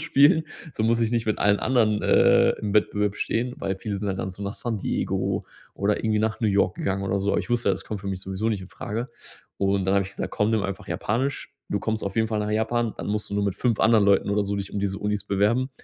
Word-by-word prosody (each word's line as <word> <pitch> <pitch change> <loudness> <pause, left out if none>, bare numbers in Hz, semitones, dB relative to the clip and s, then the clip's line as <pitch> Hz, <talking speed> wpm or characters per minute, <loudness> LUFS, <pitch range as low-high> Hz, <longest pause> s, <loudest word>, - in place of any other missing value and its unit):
ausspielen, 155 0 +4 0.3
so 110 - -1
muss 115 +1 +2
ich 115 -1 +1
nicht 115 -2 0
mit 110 - 0
allen 105 0 +3
anderen, 110 -5 +2
äh, - - +5
im 105 -1 -2
Wettbewerb 105 -1 +1
stehen." 125 +2 -1
Weil 95 -1 -2
viele 100 +1 -4
sind 105 +1 -4
halt 95 -1 -2
dann 95 - -3
so 95 - -12
nach 100 +1 -3
San 115 -3 -3
Diego - - -1 0.3
oder 100 +1 0
irgendwie 110 -1 0
nach 110 0 -1
New 115 - +2
York 100 -2 +2
gegangen 95 0 -1
oder 100 +1 0
so. 100 +1 0
Aber - - +2
ich - - -9
wusste 120 0 +1
ja, - - +2
das - - -8
kommt 105 -2 -5
für 100 - -9
mich 95 -1 -3
sowieso 95 +3 -2
nicht 105 -3 -1
in 95 - -10
Frage. 105 +4 -5 0.5
Und 100 -1 +1
dann 95 - +2
habe 100 -1 +3
ich 95 - -9
gesagt: 100 - -5
„Komm, 105 +1 +1
nimm 110 -2 +2
einfach 100 +2 -4
Japanisch, 130 +7 -2 0.2
du 100 - -1
kommst 110 -1 -2
auf 95 - -4
jeden 110 -1 +2
Fall 110 - -1
nach 105 0 -2
Japan, 110 +1 0
dann - - -5
musst 105 +1 -2
du - - -3
nur 100 0 +1
mit 100 -2 -1
5 120 -4 0
anderen 110 -2 +5
Leuten 100 0 +3
oder 105 0 +1
so 100 +1 -2
dich 100 -1 -5
um 100 - -2
diese 100 -1 -2
Unis 105 -1 -1
bewerben." 105 +7 +1
105 Hz, 275 wpm, -25 LUFS, 100-110 Hz, 0.5 s, äh